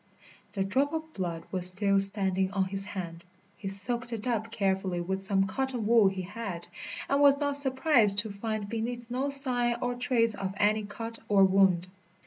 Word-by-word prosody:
The 195 -2 -2
drop 270 +10 -1
of 320 0 -6
blood 170 -3 -5
was 185 -1 +7
still 200 +1 +3
standing 195 -1 +5
on 190 -1 -1
his 195 +1 -6
hand. 170 -4 -8 0.3
He 195 - -9
soaked 235 +5 -3
it 225 -1 -6
up 230 -2 -3
carefully 190 -4 -2
with 190 +2 -4
some 195 0 0
cotton 255 +2 -4
wool 225 -2 +4
he 190 -1 -4
had, 190 -3 -8 0.4
and 280 +1 0
was 280 -1 +5
not 285 -1 -1
surprised 265 -6 +4
to 210 0 +4
find 215 0 -5
beneath 235 +2 -6
no 265 +3 -3
sign 250 -4 +2
or 245 0 -3
trace 245 -2 0
of 195 -1 -6
any 210 +1 0
cut 225 +2 -8
or 200 -2 +4
wound. 190 -2 +2
210 Hz, 180 wpm, -27 LUFS, 195-245 Hz, 0.4 s, was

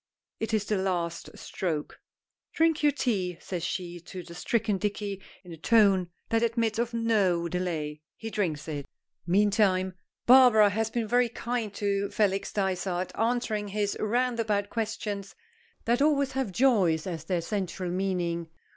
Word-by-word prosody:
It 225 - -2
is 215 -2 +1
the 210 -2 0
last 175 -3 -2
stroke. 160 -5 -4 0.5
"Drink 325 -1 +2
your 295 -1 +5
tea," 195 -11 -1
says 180 -3 -5
she 175 0 -4
to 180 +1 -9
the 170 - -11
stricken 210 +2 0
Dicky 205 -1 -3 0.2
in 175 -2 -10
a - - -9
tone 195 -1 +4 0.2
that 225 0 +2
admits 230 -1 0
of 235 0 0
no 205 -7 +1
delay. 160 -4 -3
He 225 0 -7
drinks 165 -9 -2
it. 145 -3 -5 0.4
Meantime, 190 -1 +3 0.3
Barbara 240 -5 +7
has 220 +2 0
been 225 -1 -2
very 245 +2 +3
kind 235 -2 -3
to 200 -1 0
Felix 200 -2 0
Dysart, 185 -2 -1
answering 225 -2 0
his 205 0 -1
roundabout 225 -3 0
questions 210 -3 -3 0.5
that 240 +3 +2
always 280 -2 +3
have 265 -6 -2
Joyce 190 -9 +3
as 170 -4 -5
their 180 -3 0
central 185 -1 -3
meaning. 175 -3 -1
200 Hz, 145 wpm, -28 LUFS, 180-230 Hz, 0.5 s, Barbara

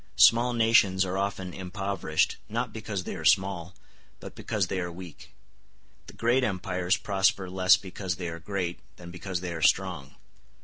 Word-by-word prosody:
Small 120 +2 +6
nations 110 -5 +4
are 95 0 -3
often 95 -2 -3
impoverished, 95 -4 -1
not 115 +1 -2
because 110 -4 -4
they - - -5
are 80 - -7
small, 95 0 +2 0.4
but - - -9
because 105 -4 -1
they 95 0 -3
are 90 -1 -3
weak; 85 -2 -11 0.7
the - - -11
great 120 +3 +2
empires 95 -2 0
prosper 100 0 +1
less 95 0 +5
because 95 -1 -5
they 90 -1 -5
are 85 0 -6
great 90 -2 -3 0.2
than 85 -1 -11
because 90 0 -5
they 90 -2 -4
are 80 - -6
strong. 85 -6 +1
95 Hz, 165 wpm, -27 LUFS, 90-100 Hz, 0.7 s, Small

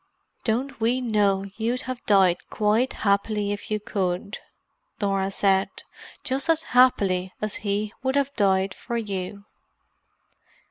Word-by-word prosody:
"Don't 245 +3 -1
we 240 +3 +2
know 205 -5 +1
you'd 235 +3 -1
have 255 -1 -6
died 190 -4 +3
quite 215 +5 +1
happily 205 +1 +1
if 205 - -5
you 215 0 0
could!" 195 -1 -3 0.6
Norah 195 -2 0
said. 195 -1 +2 0.5
"Just 270 +4 -2
as 325 -1 +3
happily 195 -8 +3
as 215 -1 -2
he 205 +1 -2
would 265 +1 0
have 280 0 0
died 190 -2 +2
for 235 - -5
you." 200 -2 -4
210 Hz, 130 wpm, -25 LUFS, 195-240 Hz, 0.6 s, died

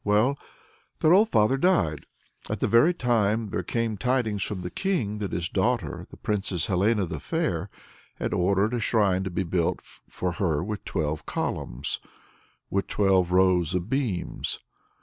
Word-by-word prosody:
Well, 105 +7 +3 0.6
their 155 - +5
old 210 +4 +5
father 120 - +3
died. 135 - +1 0.4
At - - -2
that - - +1
very 120 +9 +6
time 115 - +1
there - - -1
came 115 -2 -2
tidings 120 -3 0
from 95 0 -2
the 90 - -5
King, 120 - -1
that 100 -2 -3
his 85 0 -2
daughter, 95 - -1
the - - -13
Princess 100 -5 -1
Helena 100 +2 +2
the 90 - -5
Fair, 105 - -2 0.5
had - - -3
ordered 100 +5 +2
a 120 - 0
shrine 100 -5 +2
to - - -2
be 95 +2 -1
built 85 -1 0
for 90 - -5
her 85 -5 0
with 105 +2 -4
twelve 75 -1 -2
columns, 65 +5 -3 0.7
with 100 0 0
twelve 95 -3 +2
rows 90 -2 +3
of 90 +4 -3
beams. 125 -10 -2
100 Hz, 160 wpm, -26 LUFS, 90-115 Hz, 0.7 s, very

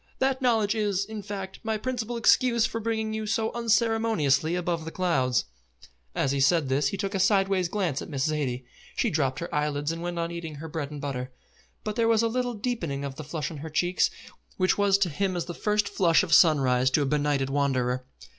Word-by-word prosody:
That 265 0 0
knowledge 225 -5 +2
is, 205 -3 0
in 220 0 -6
fact, 195 -1 -6
my 220 -1 -1
principal 240 0 -3
excuse 235 0 +4
for 230 - -3
bringing 220 -1 -2
you 220 0 -3
so 220 +1 0
unceremoniously 225 - +2
above 175 -2 -2
the 160 - -5
clouds." 135 -9 +1 0.7
As 135 - +1
he 140 - 0
said 145 +1 +3
this 135 +1 +2
he 195 - -3
took 195 +1 -3
a 195 - -1
sideway 195 -1 +3
glance 175 -6 -1
at - - -8
Miss 135 -3 -1
Zaidie. 135 -5 -2 0.3
She - - +1
dropped 135 -4 0
her 170 +1 -6
eyelids 150 0 0
and 165 0 -5
went 175 0 -4
on 170 0 -2
eating 165 -3 -6
her 155 +3 -7
bread 155 -3 -4
and 150 -1 -7
butter; 130 -3 -4 0.5
but 215 0 -4
there 230 -1 +3
was 225 0 +3
a - - +3
little 245 +1 -1
deepening 175 - -3
of 140 - -5
the 155 - -8
flush 155 +1 -4
on 160 - -7
her 155 +3 -7
cheeks 175 +4 +1 0.5
which 185 -1 +2
was 200 -1 +3
to 200 -3 +1
him 185 +5 -1
as 175 - -2
the 175 - -6
first 210 +2 0
flush 170 -3 +3
of 170 -3 -1
sunrise 130 -7 +5
to 145 +2 +2
a - - 0
benighted 145 -1 0
wanderer. 130 -3 0
175 Hz, 215 wpm, -27 LUFS, 145-215 Hz, 0.7 s, sunrise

